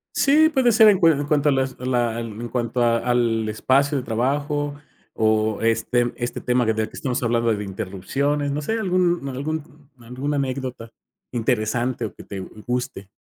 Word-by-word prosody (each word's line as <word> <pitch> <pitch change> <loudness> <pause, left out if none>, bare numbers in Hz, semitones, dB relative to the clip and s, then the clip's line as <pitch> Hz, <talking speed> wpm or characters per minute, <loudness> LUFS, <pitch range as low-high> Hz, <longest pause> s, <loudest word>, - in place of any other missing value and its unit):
Sí, 310 +3 +5
puede 260 -5 +3
ser 220 0 +7
en 200 -3 +5
cua 165 -2 +6
en 145 -1 -1
cuanto 150 -1 +2
a - - +4
las 135 -1 0
a 125 - -6
la 120 -2 0
en 115 0 -6
cuanto 120 0 -1
a 115 -1 +3
al 115 -2 +1
espacio 135 +6 +2
de 130 - -2
trabajo, 145 +5 -1 0.4
o 110 -1 +1
este 115 +2 +1
este 120 0 -4
tema 125 0 +1
del 110 0 +1
que 110 - 0
estamos 125 -2 -2
hablando 115 0 +2
de 105 -1 -3
interrupciones. 110 +9 -2
No 150 +2 -2
sé 220 - -2
algún 180 -6 +1
algún 150 +2 -6
alguna 130 +5 -3
anécdota, 130 -3 -3 0.4
interesante 120 0 -1
o 105 - -6
que - - -11
te 100 - -7
guste. 105 0 -5
125 Hz, 175 wpm, -22 LUFS, 115-145 Hz, 0.4 s, ser